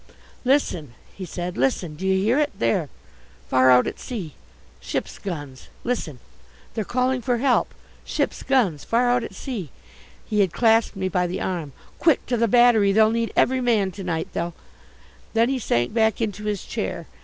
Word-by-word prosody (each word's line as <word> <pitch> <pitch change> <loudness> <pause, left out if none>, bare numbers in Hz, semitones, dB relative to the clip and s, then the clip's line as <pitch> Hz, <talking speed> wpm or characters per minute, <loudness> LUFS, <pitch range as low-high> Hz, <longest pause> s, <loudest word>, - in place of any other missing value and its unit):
"Listen," 180 - 0 0.2
he 190 - -7
said, 175 +1 -5
"listen. 145 +5 0
Do 185 +6 -4
you 190 - +3
hear 235 +7 +3
it 295 -1 +1
there 115 0 +1 0.6
far 130 0 +4
out 125 0 +6
at - - -5
sea 195 - -6 0.5
ships' - - -4
guns 145 -9 -7 0.2
listen 225 - -2 0.6
they're 220 - -2
calling 255 +3 0
for 240 +1 0
help 255 +1 +2 0.3
ships' - - -2
guns 210 - +1
far 240 +2 +2
out 245 -1 +2
at 205 - -8
sea!" 205 - -5 0.6
He 210 - -1
had 190 -4 +2
clasped 225 -1 +3
me 190 -1 -2
by 180 -1 0
the 175 - -4
arm. 165 -7 -3 0.3
"Quick, 320 -4 +3
to 250 - 0
the 230 0 +2
Battery, 230 -3 +5
they'll 215 +2 +5
need 230 0 -1
every 260 +1 +3
man 220 -6 +2
to 195 +1 -8
night, 165 -3 -2
they'll 170 0 -3 0.4
" - - -27
Then 230 +2 +4
he 270 -1 0
sank 120 - 0
back 220 -2 +2
into 210 -2 -3
his 210 -3 -2
chair. - - -4
210 Hz, 180 wpm, -23 LUFS, 175-240 Hz, 0.6 s, out